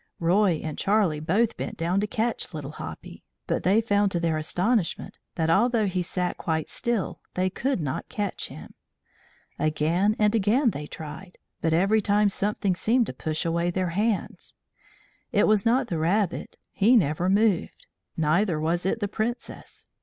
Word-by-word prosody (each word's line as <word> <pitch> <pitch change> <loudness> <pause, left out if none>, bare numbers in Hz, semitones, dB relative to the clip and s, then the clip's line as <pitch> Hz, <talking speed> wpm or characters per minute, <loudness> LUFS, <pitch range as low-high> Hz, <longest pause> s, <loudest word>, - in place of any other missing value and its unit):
Roy 175 0 +2
and 155 -2 -5
Charlie 195 -7 +2
both 200 +9 +1
bent - - -5
down 170 +4 0
to 210 - 0
catch 220 -4 -2
Little 145 -2 -5
Hoppy, - - -9 0.2
but - - -1
they 195 +6 +3
found 205 -2 +2
to 175 - 0
their 165 -2 0
astonishment 180 +5 -1 0.2
that, 160 -2 0
although 220 +6 +3
he 185 -2 -1
sat 180 +1 -2
quite 160 -2 -2
still, 235 -6 -2 0.2
they 185 0 +1
could 265 +2 -1
not 145 -5 -4
touch 205 -3 -3
him. - - -11 0.9
Again 160 +7 +1
and 210 0 +3
again 230 +4 +3
they 150 -3 -6
tried, 160 +5 -9 0.2
but 160 - +1
every 195 +7 +3
time 205 0 +3
something 200 -1 0
seemed 230 +6 +2
to - - -6
push 155 0 -3
away 170 +1 0
their 185 0 -1
hands. 205 +4 -2 0.8
It - - +3
was 215 -1 +3
not 255 +3 +3
the 170 -7 -2
rabbit 185 +4 0
he 220 +5 +4
never 175 -2 +2
moved. 200 -2 +1 0.3
Neither 165 +2 +2
was 170 +4 0
it 220 - -1
the 205 - 0
Princess. 225 +4 -5
190 Hz, 165 wpm, -26 LUFS, 165-215 Hz, 0.9 s, he